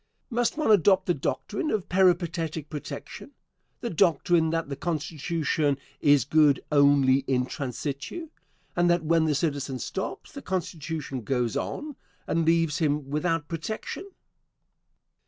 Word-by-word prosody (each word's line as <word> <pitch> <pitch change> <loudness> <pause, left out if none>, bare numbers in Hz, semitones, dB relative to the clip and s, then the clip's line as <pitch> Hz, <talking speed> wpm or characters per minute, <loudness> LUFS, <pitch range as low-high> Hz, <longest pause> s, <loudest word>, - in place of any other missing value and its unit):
Must 240 +3 0
one 305 -8 +2
adopt 190 -1 +5
the 175 - +2
doctrine 200 - -2
of 210 -8 -1
peripatetic 170 -4 +1
protection 150 -2 -7 0.5
the 235 - -3
doctrine 170 -1 +3
that 165 -1 -1
the 140 - -4
Constitution 155 -2 -1 0.2
is 145 -2 +4
good 150 -1 +4
only 140 -2 +5
in 125 -1 +1
transitu, 140 - -5 0.5
and 175 0 +3
that 175 -1 +2
when 165 0 +3
the 155 -2 +1
citizen 140 -3 -1
stops, 190 +8 -5
the 280 - -8
Constitution 160 - -4
goes 120 0 -1
on 295 -3 -4 0.3
and 165 0 0
leaves 165 -1 +2
him 145 -3 0
without 165 0 0
protection? 215 - -5
160 Hz, 130 wpm, -27 LUFS, 145-175 Hz, 0.5 s, adopt